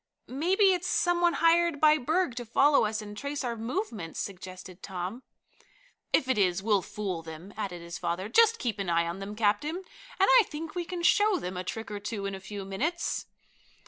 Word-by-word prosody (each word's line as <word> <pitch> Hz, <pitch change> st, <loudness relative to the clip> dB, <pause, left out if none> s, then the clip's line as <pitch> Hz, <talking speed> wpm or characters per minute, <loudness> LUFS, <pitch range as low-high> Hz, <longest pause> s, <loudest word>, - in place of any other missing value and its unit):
"Maybe 375 Hz, -, +3 dB
it's 360 Hz, 0 st, -2 dB
some 350 Hz, -2 st, +2 dB
one 345 Hz, -1 st, +4 dB
hired 335 Hz, -2 st, +3 dB
by 310 Hz, 0 st, +5 dB
Berg 315 Hz, +2 st, +1 dB
to 245 Hz, -, -3 dB
follow 275 Hz, +3 st, +4 dB
us 215 Hz, 0 st, -2 dB
and 205 Hz, 0 st, -9 dB
trace 280 Hz, +5 st, -4 dB
our 240 Hz, -2 st, -2 dB
movements," 225 Hz, -, -4 dB
suggested 185 Hz, -1 st, -7 dB
Tom. 190 Hz, +5 st, -5 dB, 0.9 s
"If 260 Hz, -, +3 dB
it 260 Hz, -4 st, +1 dB
is 185 Hz, -1 st, +2 dB
we'll 205 Hz, -3 st, +3 dB
fool 190 Hz, -4 st, -4 dB
them," 165 Hz, +4 st, -10 dB
added 180 Hz, -5 st, -5 dB
his 170 Hz, 0 st, -7 dB
father. 175 Hz, +2 st, -2 dB
"Just 455 Hz, -, +5 dB
keep 230 Hz, -4 st, -3 dB
an 195 Hz, -3 st, -2 dB
eye 170 Hz, 0 st, +2 dB
on 170 Hz, +3 st, -4 dB
them, 200 Hz, +2 st, -6 dB
captain, 215 Hz, +9 st, +1 dB
and 380 Hz, -, -9 dB, 0.5 s
I -, -, +6 dB
think 310 Hz, +1 st, -6 dB
we 350 Hz, -1 st, -3 dB
can 350 Hz, 0 st, -5 dB
show 415 Hz, +2 st, +4 dB
them 180 Hz, -, -5 dB
a 180 Hz, -, -3 dB
trick 225 Hz, +3 st, -5 dB
or 205 Hz, -, -4 dB
two 205 Hz, -1 st, -4 dB
in 195 Hz, -, -3 dB
a 190 Hz, -, -5 dB
few 195 Hz, 0 st, -7 dB
minutes." 300 Hz, -, -2 dB
220 Hz, 205 wpm, -29 LUFS, -, 0.9 s, I